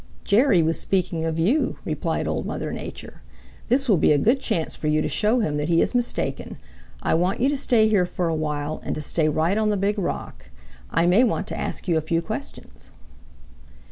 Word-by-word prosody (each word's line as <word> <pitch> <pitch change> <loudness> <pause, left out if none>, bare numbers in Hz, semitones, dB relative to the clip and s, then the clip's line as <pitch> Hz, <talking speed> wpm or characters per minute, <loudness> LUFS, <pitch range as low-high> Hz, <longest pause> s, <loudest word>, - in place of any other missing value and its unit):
"Jerry 205 - +4
was 165 +1 0
speaking 175 -4 -1
of 160 0 -2
you," 220 - +1
replied - - -2
Old - - -2
Mother - - -4
Nature. - - -8 0.5
"This 270 +3 +1
will 205 -6 +4
be 155 - +3
a 150 - +4
good 235 - +2
chance 215 -11 -2
for 155 - -4
you 155 0 +2
to - - 0
show 215 - +1
him 150 -7 -1
that 150 +2 -2
he 165 -1 +3
is - - +1
mistaken. 245 -1 -2 0.5
I - - +1
want 180 +4 +1
you 255 - +3
to 290 - 0
stay 240 -5 +3
here 200 -5 +2
for 175 -1 -2
a 165 - 0
while 150 -1 -3
and - - -3
to 155 - -4
stay 155 +1 +1
right 165 +7 +1
on 215 -1 +1
the 205 - +1
Big 205 +2 0
Rock. 65 - -5 0.4
I 165 +2 +1
may 185 +8 +5
want 220 -4 0
to - - -4
ask - - -4
you 170 -2 +2
a - - +1
few 165 +2 0
questions." 220 +8 -7
180 Hz, 215 wpm, -23 LUFS, 160-220 Hz, 0.5 s, may